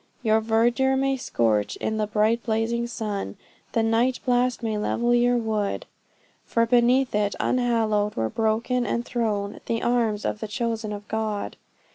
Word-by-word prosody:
Your 220 -1 +3
verdure 240 +4 +2
may 270 0 +1
scorch 110 - 0
in 220 - -2
the 215 -1 0
bright 215 +3 +2
blazing 230 +1 -1
sun, 210 - -4 0.4
The 225 - +2
night 230 +3 +2
blast 250 -1 +1
may 220 -1 -1
level 240 +3 +1
your 245 0 +3
wood; 215 -3 -2 0.6
For 230 0 +1
beneath 245 +2 +3
it, 205 -1 0
unhallowed, 220 -4 +1
were 110 - 0
broken 230 - 0
and 235 0 -2
thrown 210 -4 -2
The 230 0 -1
arms 230 -4 +1
of - - -2
the 220 - -4
chosen 225 -1 -2
of 205 0 -7
God. 215 -2 -3
225 Hz, 155 wpm, -25 LUFS, 210-240 Hz, 0.6 s, Your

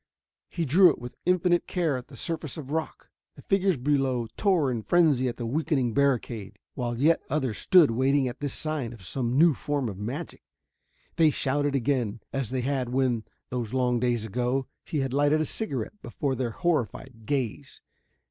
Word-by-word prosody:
He 170 - -2
drew 175 +6 +7
it 150 - -1
with 120 0 -9
infinite 180 -1 +2
care 170 -6 0
on 125 -1 -5
the - - -13
surface 165 -4 -4
of 145 -3 -7
rock. 160 +1 -4 0.2
The - - -14
figures 195 -4 +2
below 130 -2 +1
tore 175 -10 +2
in 115 -3 -2
frenzy 150 -3 +3
at 120 - -3
the 120 - -4
weakening 135 -2 0
barricade, 115 -7 0 0.2
while 120 -3 -3
yet 155 +4 +4
others 135 -6 -1
stood 175 -9 +6
waiting 135 +3 +2
at 125 - -6
this 145 -2 -3
sign 155 -7 -3
of 105 -6 -12
some 125 +3 -1
new 165 +1 +6
form 145 -1 -2
of 100 -3 -6
magic. 130 +11 -5 0.8
They 160 -2 +6
shouted 145 0 0
again, 125 -4 0
as 135 -5 -2
they 130 -1 -1
had 130 -1 -1
when, 125 -3 0 0.3
those 120 -1 -3
long 125 -2 +2
days 120 -2 0
ago, 125 +4 -1 0.2
he 150 - -2
had 135 -1 -2
lighted 145 +2 +3
a 155 - +1
cigarette 180 - -4
before 135 +2 -2
their 130 -2 -1
horrified 125 -5 -2
gaze. 130 -7 -3
135 Hz, 180 wpm, -27 LUFS, 120-155 Hz, 0.8 s, drew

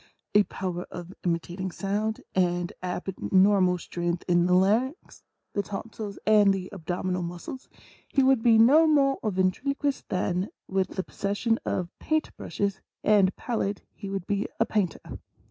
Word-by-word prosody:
a 210 - +7
power 180 -2 -4
of 175 +1 -8
imitating 175 +2 -2
sounds, 210 +4 -2
and 175 -1 +1
abnormal 185 +1 +2
strength 175 0 -3
in 175 -1 +3
the 180 - +4
larynx, 230 - +1 0.3
the 200 - +1
tonsils 205 +1 -6
and 210 -2 +6
the 190 -1 -3
abdominal 180 0 -2
muscles, 175 +9 -7 0.4
he 270 - +2
would 265 -3 +4
be 230 -1 +5
8 220 - +7
INTRODUCTION. - - +8
no 310 +6 +6
more 275 -3 +3
a 215 - 0
ventriloquist 270 +10 -1
than 185 +1 -1 0.2
with 190 -1 0
the 190 - -1
possession 205 +5 -1
of 180 -1 -2
paint 315 0 -1
brushes 200 -1 -3 0.2
and 200 -3 +4
pallet 205 -4 -2
he 200 - -8
would 195 -2 -3
be 205 +1 -1
a - - +4
painter. 200 -6 -2
195 Hz, 155 wpm, -27 LUFS, 180-220 Hz, 0.4 s, INTRODUCTION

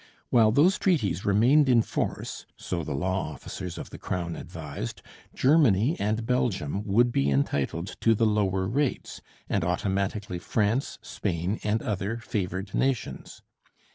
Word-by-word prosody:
While 110 -3 +5
those 165 - +4
treaties 110 - +1
remained 125 +8 +4
in 120 -3 +5
force, - - -4
so 85 -2 -3
the 75 - -3
law 95 +3 -1
officers 90 +1 -7
of - - -8
the - - -9
Crown 85 -2 -3
advised, 75 -8 -7 0.3
Germany 135 - +4
and 110 +2 -1
Belgium 100 - 0
would 120 +5 +3
be 70 -9 +1
entitled 70 +5 -1
to 115 0 +4
the 115 - +2
lower 95 -3 +1
rates, 135 +5 -2 0.3
and - - 0
automatically 95 +2 -1
France, 110 +7 0
Spain, 90 +5 -2
and 110 +2 0
other 105 +2 -2
favoured 95 -3 -4
nations. 130 -3 -2
100 Hz, 140 wpm, -27 LUFS, 90-115 Hz, 0.3 s, While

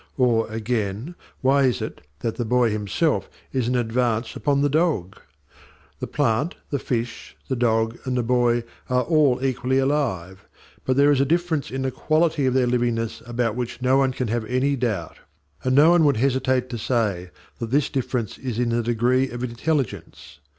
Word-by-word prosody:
Or, 120 -4 +2
again, 110 - -2 0.3
why 135 +1 +4
is 125 - +1
it - - -6 0.2
that 115 - -2
the 120 - -1
boy 120 0 +2
himself 105 - 0 0.2
is 130 -3 0
an 125 - 0
advance 115 -1 0
upon 140 -1 +1
the - - +4
dog? 145 - 0 0.8
The - - -4
plant, 115 +9 0 0.2
the 140 - 0
fish, 115 -2 -4
the 130 - -1
dog, 115 -1 +1
and 130 -1 -1
the 120 - +1
boy 120 0 +2 0.3
are 125 0 +2
all 140 -5 +2
equally 130 0 0
alive; 110 - -1 0.4
but 130 0 +1
there 140 +1 +5
is 140 -2 +3
a - - +5
difference 165 0 0
in 135 +1 -3
the 130 - -1
quality 155 +1 +1
of 130 - +1
their 130 -1 +3
livingness 120 -2 -1
about 120 -2 -1
which 120 -1 -4
no 130 +1 +4
one 135 -1 +3
can 125 -2 -3
have 115 0 -1
any 130 +4 +1
doubt, 110 -10 -2 0.5
and 130 0 +1
no 150 +4 +7
one 175 -2 +5
would 140 -5 +3
hesitate 130 0 +1
to 120 - -4
say 105 -7 -1 0.3
that 115 - -4
this 140 +3 +2
difference 125 -4 -2
is 125 -4 -4
in 120 -1 +1
the 120 0 +1
degree 120 +3 +1
of 120 +1 -6
intelligence. 120 - -3
125 Hz, 185 wpm, -23 LUFS, 115-135 Hz, 0.8 s, no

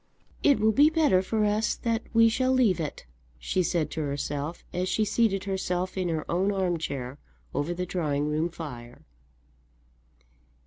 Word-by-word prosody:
"It 285 -2 +4
will 220 +1 +4
be 290 +8 +6
better 310 - +3
for 215 +3 0
us 210 +1 +1
that 230 -1 -1
we 230 0 +6
shall 255 +3 +1
leave 240 -9 +3
it," 150 - -5 0.3
she - - -1
said 165 -4 0
to 160 - -3
herself 145 +2 -3
as 180 +1 -1
she 215 +3 +1
seated 210 -3 +1
herself 185 -2 -2
in 185 -2 -1
her 160 -2 -2
own 190 +4 +1
arm 185 -4 0
chair 135 -3 -5 0.3
over 145 +4 -1
the 180 +1 -2
drawing 150 -5 -1
room 155 +3 0
fire. 125 -8 -9
180 Hz, 165 wpm, -27 LUFS, 155-215 Hz, 0.3 s, be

